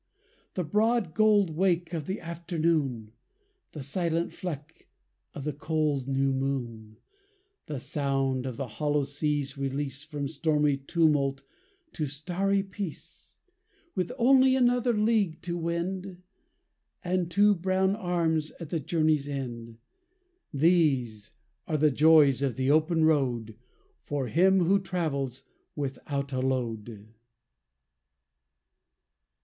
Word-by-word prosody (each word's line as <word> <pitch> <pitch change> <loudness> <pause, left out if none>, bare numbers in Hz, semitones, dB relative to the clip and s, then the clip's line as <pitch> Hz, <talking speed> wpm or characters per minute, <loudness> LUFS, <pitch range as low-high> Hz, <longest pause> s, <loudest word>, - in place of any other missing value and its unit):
The 180 - -1
broad 210 +1 +1
gold 210 -4 +4
wake 175 0 0
of 155 -3 -4
the 190 - -3
afternoon; 160 - -1 0.6
The 150 - -6
silent 165 +3 -1
fleck 160 -3 -7 0.5
of 140 - -6
the 150 +1 -2
cold 150 -2 -1
new 135 0 +1
moon; 120 -5 -3 0.7
The 150 -3 -4
sound 135 -2 -1
of 125 - -5
the 135 - -3
hollow 145 +5 0
sea's 145 0 -2
release 135 0 -3
From 150 -2 -4
stormy 150 -1 +1
tumult 140 -2 +1 0.5
to 155 - -2
starry 180 +8 -1
peace; 195 -4 -8 0.6
With 185 +4 -2
only 260 +1 +5
another 245 -2 +2
league 210 -6 +1
to 175 -1 -3
wend; 175 +2 -3 0.8
And 180 -1 0
two 205 +3 +4
brown 190 +1 +1
arms 165 -5 0
at 165 -4 -7
the 165 - 0
journey's 155 -1 +1
end! 120 -5 -6 0.7
These 140 - +2 0.4
are 155 - 0
the 150 0 +3
joys 150 -2 +5
of 135 -4 0
the 130 +1 +1
open 160 +1 +3
road 125 -8 +1 0.5
For 140 -3 -3
him 190 +3 +4
who 195 +4 +3
travels 140 -9 -3 0.3
without 140 0 -4
a 130 - 0
load. 115 -4 -3
155 Hz, 115 wpm, -28 LUFS, 135-180 Hz, 0.8 s, only